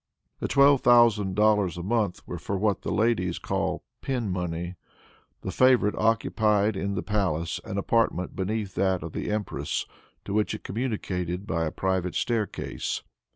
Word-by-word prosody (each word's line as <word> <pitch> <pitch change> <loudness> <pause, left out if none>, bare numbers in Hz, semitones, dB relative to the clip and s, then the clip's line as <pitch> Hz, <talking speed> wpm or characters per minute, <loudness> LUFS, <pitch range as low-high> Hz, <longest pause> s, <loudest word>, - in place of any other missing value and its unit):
The - - -2
twelve 140 -1 +5
thousand 115 -6 +5
dollars 105 -5 +3
a 85 - -5
month 105 -2 -1
were - - -5
for 100 - -3
what 100 -1 +1
the - - -3
ladies 105 -6 +1
call - - -2 0.2
pin 120 -7 -2
money. 90 -1 -3 0.7
The - - -4
favorite 125 -5 +4
occupied 110 -1 +2
in 100 +1 -2
the 90 - -2
palace 90 -6 -1
an 100 -3 -4
apartment 100 -3 +1
beneath 100 +1 -2
that 95 -3 +1
of 80 - -7
the - - -3
empress, 105 -1 -2 0.4
to 100 - -4
which 105 0 +1
it - - -10
communicated 95 -5 -3
by 80 -4 -1
a 80 - -2
private 95 -1 -1
stair 115 -4 +1
case. - - -4
100 Hz, 160 wpm, -27 LUFS, 90-110 Hz, 0.7 s, twelve